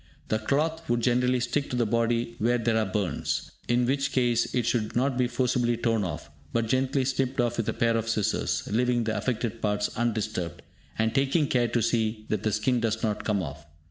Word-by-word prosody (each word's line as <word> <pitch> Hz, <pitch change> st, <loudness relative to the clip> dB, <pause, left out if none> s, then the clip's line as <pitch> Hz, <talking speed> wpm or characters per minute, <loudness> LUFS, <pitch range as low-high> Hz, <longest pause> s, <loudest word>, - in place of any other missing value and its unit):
The 110 Hz, -, +1 dB
cloth 160 Hz, +7 st, -1 dB
would 120 Hz, 0 st, +2 dB
generally 125 Hz, +1 st, +2 dB
stick 130 Hz, +4 st, -1 dB
to -, -, -2 dB
the 120 Hz, -1 st, +2 dB
body 115 Hz, +1 st, 0 dB
where 120 Hz, +3 st, +2 dB
there 115 Hz, -1 st, +1 dB
are 110 Hz, -2 st, +2 dB
burns, 95 Hz, -5 st, -2 dB, 0.2 s
in 120 Hz, +1 st, +2 dB
which 135 Hz, +2 st, 0 dB
case 120 Hz, -2 st, +1 dB
it 125 Hz, -3 st, 0 dB
should 110 Hz, -3 st, 0 dB
not 130 Hz, +2 st, +2 dB
be 125 Hz, -1 st, +2 dB
forcibly 120 Hz, -1 st, +1 dB
torn 115 Hz, -2 st, +1 dB
off, 85 Hz, -5 st, -5 dB, 0.2 s
but 115 Hz, +5 st, +1 dB
gently 130 Hz, +2 st, +1 dB
snipped 130 Hz, -1 st, -1 dB
off 120 Hz, 0 st, +1 dB
with 115 Hz, -, -1 dB
a -, -, 0 dB
pair 115 Hz, 0 st, +2 dB
of 115 Hz, 0 st, -1 dB
scissors, 110 Hz, -3 st, 0 dB
leaving 120 Hz, +2 st, +2 dB
the 110 Hz, 0 st, -1 dB
affected 115 Hz, -2 st, -2 dB
parts 105 Hz, -1 st, 0 dB
undisturbed, 110 Hz, -7 st, -2 dB, 0.3 s
and 110 Hz, 0 st, +1 dB
taking 140 Hz, +4 st, +2 dB
care 125 Hz, -3 st, +2 dB
to 115 Hz, 0 st, 0 dB
see 110 Hz, -1 st, 0 dB
that 105 Hz, -3 st, 0 dB
the 110 Hz, -, 0 dB
skin 120 Hz, +4 st, +1 dB
does 110 Hz, -1 st, -1 dB
not 105 Hz, -2 st, -1 dB
come 100 Hz, -3 st, 0 dB
off. 75 Hz, 0 st, -8 dB
115 Hz, 205 wpm, -27 LUFS, 110-125 Hz, 0.3 s, would